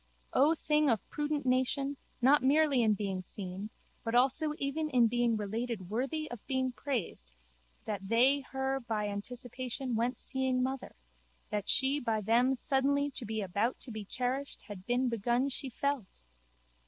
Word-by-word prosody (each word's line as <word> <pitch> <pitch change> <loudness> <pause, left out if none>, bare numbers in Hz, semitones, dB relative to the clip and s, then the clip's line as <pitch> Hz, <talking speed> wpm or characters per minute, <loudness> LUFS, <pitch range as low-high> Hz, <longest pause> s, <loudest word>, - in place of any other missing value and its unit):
O 295 +5 +5
thing 300 -2 +2
of 225 -4 +1
prudent 295 -1 -2
nation 260 +2 +1 0.3
not 285 +3 +6
merely 280 0 +4
in 215 -2 +3
being 195 -2 -3
seen 190 +2 -5 0.3
but 225 +1 -1
also 270 +5 +3
even 300 +3 -2
in 250 -4 +4
being 235 0 +2
related 215 -2 -3
worthy 275 +7 -1
of 240 -4 -7
being 260 -1 0
praised 235 - -4 0.5
that 200 -3 -4
they 255 +5 +5
her 265 0 -2
by 220 -4 -2
anticipation 245 +4 -4
went 240 +2 0
seeing 260 -1 0
mother, 265 0 -4 0.6
that 210 -1 -2
she 270 +3 +5
by 225 -4 0
them 235 +5 +3
suddenly 280 +2 +1
to 255 -2 -2
be 220 0 -2
about 205 +6 -1
to 250 - -2
be 215 -1 -5
cherished 255 +6 -3
had 195 -3 -10
been 250 +2 +2
begun 240 +3 +1
she 270 0 0
felt! 260 - -3
250 Hz, 155 wpm, -32 LUFS, 220-275 Hz, 0.6 s, not